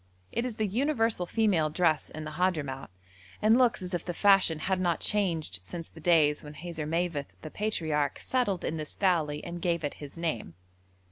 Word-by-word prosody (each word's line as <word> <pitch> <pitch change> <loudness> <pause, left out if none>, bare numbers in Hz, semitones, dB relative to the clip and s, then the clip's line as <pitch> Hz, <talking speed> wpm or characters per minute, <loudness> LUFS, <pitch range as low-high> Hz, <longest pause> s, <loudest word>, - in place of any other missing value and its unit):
It 235 +2 -1
is 240 - -5
the 220 -1 0
universal 225 -4 +1
female 190 -8 +2
dress 155 -2 +1
in 155 - -7
the 155 - -6
Hadhramout, 150 -6 -1 0.5
and 215 +2 +5
looks 245 -6 +3
as 180 0 -4
if 175 - -1
the 175 - -4
fashion 195 -5 +5
had 185 +4 0
not 175 -2 +1
changed 165 - 0
since 165 - -6
the 160 - -14
days 155 -3 +3
when 150 0 -9
Hazarmaveth 165 -1 -2 0.2
the 155 - -7
Patriarch 160 -9 -1
settled 240 -8 0
in 160 - -2
this 155 -1 -6
valley 160 -6 +1
and 175 0 -6
gave 170 -2 0
it 145 - -2
his 145 +2 -9
name. 120 - -3
170 Hz, 185 wpm, -29 LUFS, 155-195 Hz, 0.5 s, and